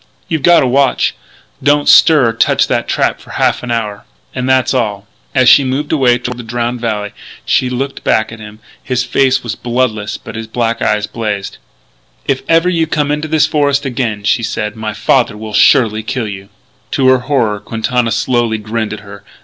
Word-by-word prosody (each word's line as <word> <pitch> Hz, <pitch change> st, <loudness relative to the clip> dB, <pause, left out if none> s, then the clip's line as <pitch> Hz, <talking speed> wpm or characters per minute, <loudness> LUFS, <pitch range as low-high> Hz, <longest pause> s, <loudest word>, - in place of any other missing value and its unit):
You've 160 Hz, -3 st, -2 dB
got 175 Hz, +2 st, +5 dB
a -, -, +1 dB
watch.... 135 Hz, +2 st, +2 dB, 0.5 s
Don't 145 Hz, +1 st, +2 dB
stir 150 Hz, -7 st, +6 dB
or -, -, -2 dB
touch 115 Hz, -, +2 dB
that -, -, -1 dB
trap -, -, 0 dB
for -, -, -17 dB
half -, -, 0 dB
an 125 Hz, -, -7 dB
hour.... 105 Hz, -3 st, -3 dB, 0.3 s
And 130 Hz, 0 st, -3 dB
that's 130 Hz, 0 st, +2 dB
all." 105 Hz, -6 st, -2 dB, 0.3 s
As 130 Hz, -2 st, +4 dB
she 140 Hz, -, +7 dB
moved 135 Hz, +3 st, -2 dB
away 130 Hz, -5 st, +3 dB
toward 125 Hz, 0 st, -6 dB
the -, -, -6 dB
Drowned 120 Hz, +1 st, -3 dB
Valley 105 Hz, -3 st, -2 dB
trail -, -, -28 dB, 0.3 s
she 130 Hz, -, +1 dB
looked 135 Hz, +2 st, -4 dB
back 110 Hz, 0 st, +1 dB
at 115 Hz, -, -10 dB
him. 105 Hz, 0 st, -11 dB, 0.2 s
His 125 Hz, -1 st, -1 dB
face 130 Hz, +1 st, +1 dB
was 120 Hz, -3 st, -3 dB
bloodless 120 Hz, -4 st, -2 dB
but -, -, -10 dB
his 115 Hz, 0 st, -6 dB
black 115 Hz, +1 st, -2 dB
eyes 105 Hz, 0 st, +1 dB
blazed. 105 Hz, -4 st, -4 dB, 0.7 s
"If 135 Hz, -1 st, 0 dB
ever 165 Hz, +2 st, +4 dB
you 165 Hz, -3 st, +1 dB
come 150 Hz, -2 st, -1 dB
into 150 Hz, +1 st, -2 dB
this 155 Hz, -1 st, +3 dB
forest 145 Hz, -2 st, +1 dB
again," 120 Hz, -5 st, -2 dB
she 115 Hz, +4 st, +1 dB
said, 105 Hz, -1 st, -3 dB
"my 110 Hz, -1 st, -5 dB
father 120 Hz, -4 st, +1 dB
will 110 Hz, 0 st, -8 dB
surely 110 Hz, +1 st, +4 dB
kill 120 Hz, +1 st, -3 dB
you." 100 Hz, -1 st, -8 dB, 0.4 s
To 135 Hz, -2 st, +2 dB
her 130 Hz, 0 st, +4 dB
horror 120 Hz, -6 st, 0 dB
Quintana 115 Hz, +2 st, -1 dB
slowly 115 Hz, 0 st, 0 dB
grinned 110 Hz, +1 st, -3 dB
at 110 Hz, -, -8 dB
her. 100 Hz, -1 st, -12 dB
120 Hz, 200 wpm, -14 LUFS, 110-135 Hz, 0.7 s, she